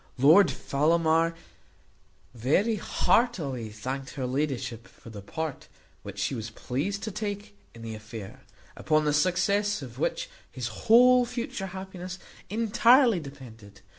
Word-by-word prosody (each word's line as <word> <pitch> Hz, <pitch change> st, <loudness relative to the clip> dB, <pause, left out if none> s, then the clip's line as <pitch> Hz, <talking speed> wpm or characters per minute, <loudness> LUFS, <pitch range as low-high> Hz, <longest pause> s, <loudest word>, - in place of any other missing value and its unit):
Lord 160 Hz, +9 st, +6 dB
Fellamar 165 Hz, +3 st, +1 dB, 1.0 s
very 155 Hz, -, +1 dB
heartily 155 Hz, -, 0 dB
thanked 130 Hz, +6 st, -6 dB
her 135 Hz, -3 st, -3 dB
ladyship 125 Hz, -4 st, -3 dB
for 115 Hz, -, -15 dB
the 105 Hz, -2 st, -8 dB
part 160 Hz, +8 st, -5 dB, 0.3 s
which 100 Hz, 0 st, -9 dB
she 100 Hz, +7 st, -1 dB
was 115 Hz, -3 st, -5 dB
pleased 145 Hz, -, -3 dB
to 215 Hz, -, -3 dB
take 205 Hz, 0 st, -5 dB, 0.2 s
in 115 Hz, -, -11 dB
the 115 Hz, -1 st, -5 dB
affair, 110 Hz, -1 st, -9 dB, 0.3 s
upon 155 Hz, -1 st, +1 dB
the 150 Hz, -, +2 dB
success 185 Hz, +4 st, +1 dB
of 125 Hz, -1 st, -10 dB
which -, -, -1 dB, 0.2 s
his 120 Hz, -2 st, -4 dB, 0.2 s
whole 250 Hz, +2 st, +7 dB
future 235 Hz, -5 st, -4 dB
happiness 185 Hz, -1 st, -7 dB, 0.3 s
entirely 230 Hz, +1 st, +4 dB
depended. 115 Hz, -9 st, -12 dB
155 Hz, 130 wpm, -27 LUFS, 120-200 Hz, 1.0 s, whole